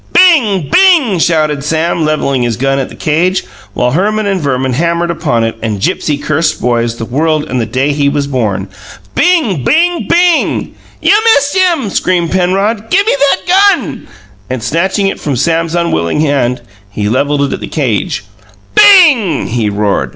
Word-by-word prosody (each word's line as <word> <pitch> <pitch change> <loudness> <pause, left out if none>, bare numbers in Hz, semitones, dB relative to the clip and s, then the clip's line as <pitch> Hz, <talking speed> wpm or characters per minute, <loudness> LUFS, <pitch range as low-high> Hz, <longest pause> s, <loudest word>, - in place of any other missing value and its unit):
"Bing! 235 - +3
Bing!" 330 - +4
shouted 155 -4 0
Sam, 160 +2 -1
levelling 150 -4 -1
his 120 -3 -1
gun 135 +1 0
at 135 - -3
the - - -12
cage, 175 +5 0 0.3
while 125 0 0
Herman 210 +7 0
and 195 -3 -1
Verman 130 -2 -1
hammered 170 +4 -1
upon 150 -9 -1
it, 115 0 -2
and 110 -3 -3
Gipsy 145 +8 -1
cursed 155 +2 -1
boys, 120 -1 -1
the 115 - -6
world 155 +5 0
and 125 -1 -2
the 110 - -3
day 130 +5 -1
he 140 -1 +1
was 140 0 -1
born. 110 -8 -2 0.5
"Bing! 300 - +1
Bing! 340 - +1
Bing!" 345 -1 +1 0.3
"You - - +4 0.2
missed 285 +3 0
him!" 340 - +1
screamed 175 -3 0
Penrod. 195 +4 -1
"Give 400 +3 +2
me 445 - +2
that 280 +5 +1 0.3
gun!" - - -8 0.4
And 130 -3 -4
snatching 190 +5 -1
it 195 - -2
from 145 -3 -3
Sam's 165 +5 -1
unwilling 150 - -1
hand, 130 -5 0 0.3
he 105 0 -3
levelled 140 +5 0
it 140 - -2
at - - -4
the - - -7
cage. - - -2 0.5
"BING!" 330 - +4
he 115 -2 -1
roared. 100 0 -1
160 Hz, 170 wpm, -11 LUFS, 130-205 Hz, 0.5 s, Bing